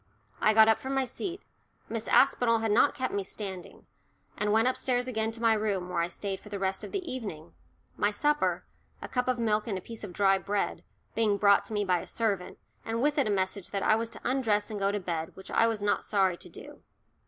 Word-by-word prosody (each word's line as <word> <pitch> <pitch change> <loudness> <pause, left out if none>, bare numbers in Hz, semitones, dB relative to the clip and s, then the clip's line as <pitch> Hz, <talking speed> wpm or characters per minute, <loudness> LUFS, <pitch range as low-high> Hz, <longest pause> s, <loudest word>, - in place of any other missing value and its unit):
I 215 - +3
got 220 0 +8
up 225 - +4
from 265 +1 -4
my 270 -1 +2
seat 350 +9 -5 0.4
Miss 230 -1 -4
Aspinall 245 -4 +4
had 225 -1 -1
not 260 +7 +4
kept 260 -2 -2
me 200 - -1
standing 190 -2 -7 0.5
and 210 0 0
went 225 +3 +4
upstairs 255 -1 0
again 220 -3 -1
to 230 - -6
my 225 -1 +5
room, 205 -4 -1
where 180 -1 -1
I 170 - 0
stayed 195 +2 -4
for 210 - -13
the 205 - -4
rest 190 0 -2
of - - -7
the 385 -4 -3
evening, 185 -10 -7 0.4
my 205 - +2
supper 295 +8 0 0.3
a - - -7
cup 250 -1 -1
of 255 -1 +1
milk 215 -2 0
and 200 -4 -1
a - - -3
piece 225 +4 -9
of 200 - -6
dry 195 0 +3
bread 200 +1 -2 0.3
being 215 -3 +2
brought 200 0 +4
me 205 -2 -1
by 180 -2 +2
a - - -9
servant, 200 -6 -2 0.3
and 225 +1 -2
with 295 +3 +2
it 275 - +2
a - - 0
message 190 -1 -1
that 200 -1 -2
I - - +4
was 225 +1 -2
to - - -10
undress 225 -5 +1
and 210 - -4
go 200 0 +1
to 205 - -1
bed, 165 -3 -4
which 190 - -10
I 230 - +4
was 220 -3 -2
not 205 - +1
sorry 190 -3 +2
to - - -12
do. - - -12
210 Hz, 235 wpm, -29 LUFS, 195-230 Hz, 0.5 s, got